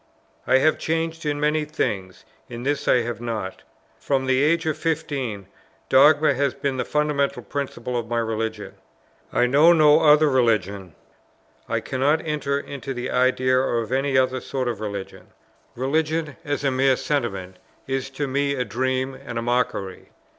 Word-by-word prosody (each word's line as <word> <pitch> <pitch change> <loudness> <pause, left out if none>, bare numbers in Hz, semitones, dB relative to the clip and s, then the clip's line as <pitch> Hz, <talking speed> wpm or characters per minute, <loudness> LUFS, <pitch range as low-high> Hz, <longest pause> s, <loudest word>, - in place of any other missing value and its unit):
I 130 - +5
have 155 +4 +2
changed 165 0 -2
in 145 0 -1
many 150 +1 +1
things: 100 -11 -3 0.2
in 120 0 -7
this 145 +1 -1
I 125 - +4
have 120 0 -5
not. 110 -5 -4 0.4
From 135 -2 0
the 130 0 +2
age 165 +3 +2
of 155 -2 0
fifteen, 140 - -3 0.4
dogma 150 +3 +5
has 140 0 0
been 135 -2 -2
the - - -1
fundamental 150 -2 0
principle 125 -3 -4
of 120 -1 -2
my 120 0 -2
religion: 110 -2 -3 0.6
I 125 - +3
know 145 +7 +6
no 155 -2 +6
other 155 -1 +5
religion; 100 - 0 0.7
I - - 0
cannot 145 +5 0
enter 145 -2 -1
into 140 -1 -6
the 125 +1 -4
idea 130 0 +2
of 120 -3 -1
any 135 +1 +1
other 130 0 +1
sort 130 -2 -3
of 115 -4 -3
religion; 100 -2 -6 0.5
religion, 155 +3 -1
as 145 -1 -3
a 135 - +2
mere 130 0 +3
sentiment, 100 -11 -3 0.3
is 135 0 -3
to 140 +2 -3
me 140 +1 0
a 125 -2 -1
dream 130 +4 -1
and 130 -2 -8
a 115 - -2
mockery. 115 -6 -2
130 Hz, 160 wpm, -23 LUFS, 120-145 Hz, 0.7 s, know